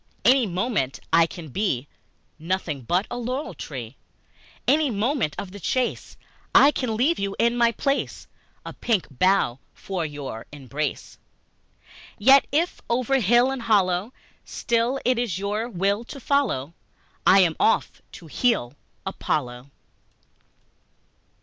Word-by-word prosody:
Any 255 -3 +5
moment 180 - -1
I 165 0 +6
can 165 -3 -9
be 145 - -1 0.5
Nothing 165 -4 -2
but 175 - 0
a 245 - -3
laurel 255 +5 -3
tree. 125 -4 -8 0.7
Any 300 0 +3
moment 225 - 0
of 190 - -6
the 205 - -9
chase 250 +7 -2 0.4
I 285 - +8
can 250 -6 -2
leave 295 +9 +2
you 200 0 -2
in 235 +1 +2
my 235 -1 +3
place 275 +4 -2 0.4
A - - -6
pink 220 -6 0
bough 140 -4 +2 0.2
for 190 -3 -4
your 145 -7 -6
embrace. 145 +1 -5 1.0
Yet 270 +6 +6
if 330 +5 0
over 255 +3 +1
hill 240 +4 +4
and 270 -2 -4
hollow 200 -2 +1 0.3
Still 235 +3 -1
it 250 -1 +2
is 225 -8 -1
your 210 +4 -2
will 200 +2 0
to 275 - -9
follow, 240 - 0 0.5
I 195 +1 +7
am 170 -3 +2
off; - - +1
to 175 - -11
heel, 165 - 0 0.3
Apollo! 125 -2 -3
205 Hz, 130 wpm, -24 LUFS, 160-245 Hz, 1.0 s, I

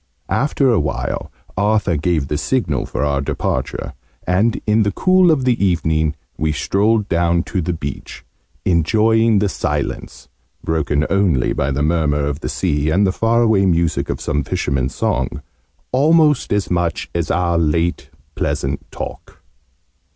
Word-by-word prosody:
After 135 -1 +2
a 110 - +3
while, 75 -2 -3 0.2
Arthur 105 -2 +1
gave 80 -2 0
the 75 +1 -2
signal 130 -2 -1
for - - -3
our 70 -1 0
departure, 70 - -3 0.3
and 100 +6 +1
in 110 +1 +3
the 100 -1 +1
cool 185 - +4
of 140 -5 +2
the 120 -5 +1
evening 80 -4 +1 0.2
we 80 0 +1
strolled 105 +7 +1
down 85 -1 +1
to 95 - -2
the 90 +2 -2
beach, 70 -4 -7 0.4
enjoying 110 +6 +3
the 100 +1 +2
silence, 75 -6 -4 0.4
broken 80 -2 0
only 95 -10 +2
by - - -1
the 70 +1 -1
murmur 75 -2 +1
of 70 0 -3
the - - -4
sea 75 -4 0
and 95 +6 +3
the 95 - +2
far 115 +3 +2
away 105 -4 +3
music 85 -2 0
of - - -2
some - - -1
fishermen's 65 -2 -2
song, 65 0 -1 0.5
almost 150 +1 +3
as 105 -2 0
much 85 -1 -1
as 85 -2 -2
our 85 -1 +1
late 85 +2 0 0.2
pleasant 70 0 -2
talk. - - -8
85 Hz, 150 wpm, -19 LUFS, 75-110 Hz, 0.5 s, cool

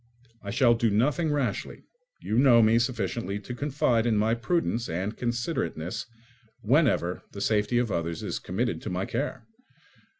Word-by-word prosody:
I 100 - -7
shall 120 +3 +4
do 115 -1 +1
nothing 145 +10 +1
rashly: 145 -3 -2 0.4
you 110 - 0
know 120 -4 +6
me 110 +2 +4
sufficiently 115 -3 -2
to 125 - -7
confide 125 -4 +1
in 110 -2 +2
my 110 +2 +2
prudence 120 -1 -1
and 95 +6 -3
considerateness 120 - -3 0.5
whenever 120 - +2
the 100 - -7
safety 105 +3 +1
of 120 -3 +1
others 85 -2 -2
is - - -3
committed 95 -2 -2
to - - -5
my 90 +1 -2
care. 145 - -3
115 Hz, 155 wpm, -27 LUFS, 100-125 Hz, 0.5 s, know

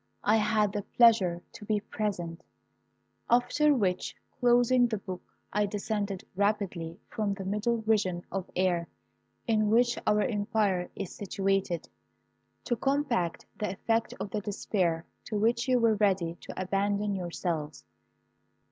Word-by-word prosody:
I 215 +2 +4
had 210 -1 +2
the 205 - -1
pleasure 195 -6 +4
to 230 -2 -11
be 210 0 +1
present, 180 -5 -4 0.9
after 245 +5 +4
which, 185 -6 0 0.2
closing 245 0 +5
the 225 -2 -2
book, 185 -2 -6 0.3
I 210 +1 +2
descended 205 -1 -2
rapidly 195 -5 -1
from 205 -2 -1
the 195 -1 -6
middle 220 +3 0
region 195 -5 +1
of 195 -2 -3
air 180 -2 +1 0.6
in 215 -2 +2
which 235 +2 +3
our 210 0 +4
empire 205 -4 0
is 195 -3 -5
situated, 195 -3 -1 0.8
to 240 - 0
combat 255 - 0
the 210 - -1
effect 225 +4 -1
of 200 - -4
the 210 - -1
despair 185 -5 -1 0.2
to 220 - -4
which 235 +3 +2
you 255 -1 +4
were 230 -2 +4
ready 195 -5 +1
to - - -8
abandon 200 +2 0
yourselves. 170 - -3
205 Hz, 135 wpm, -29 LUFS, 185-225 Hz, 0.9 s, closing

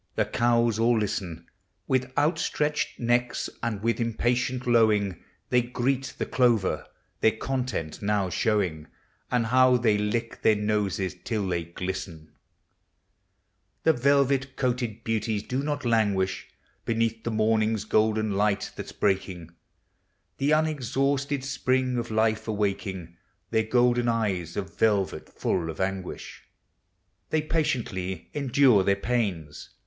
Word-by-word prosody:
The - - +2
cows 115 -2 +2
all 115 +1 +3
listen 90 -5 -3 0.4
With 130 0 0
outstretched 150 0 0
necks, 120 +1 0
and 110 -3 -3
with 115 +1 +1
impatient 125 +2 0
lowing; 110 -6 +2 0.3
They 125 -1 +5
greet 125 +1 -2
the - - -1
clover, 115 -10 +1 0.3
their 110 0 +3
content 125 - -3
now 100 -3 0
show 105 +1 +2
ing— 80 -4 -6 0.4
And 125 -2 +1
how 130 +1 +5
they 110 -4 +2
lick 115 +3 -2
their 110 - +4
noses 105 -3 -1
till 105 -4 -2
they 85 -2 -1
glisten! 90 -2 -6 1.5
The 160 - +5
velvet 140 0 +2
coated 120 -3 -2
beauties 110 -2 -1
do 130 +2 -2
not 145 -1 -3
languish 100 -5 +1 0.4
Beneath 115 -1 -1
the - - -2
morning's 110 -1 +1
golden 110 0 +2
light 100 0 0
that - - -6
's - - -11
breaking, 95 -4 -1 0.9
The 140 - +1
unexhausted 140 -2 0
spring 130 -1 0
of 120 - -4
life 110 0 +1
awaking, 95 -5 -3 0.3
Their 110 -1 +2
golden 120 +1 +2
eyes 100 -8 -1
of 100 0 -5
velvet 100 -4 +1
full 85 -3 -1
of 80 - -7
anguish. 95 -1 -4 0.9
They 155 -1 +1
patiently 115 - -2
endure 130 -6 +4
their 100 +1 +3
pains. 100 -10 -2
110 Hz, 125 wpm, -26 LUFS, 100-125 Hz, 1.5 s, They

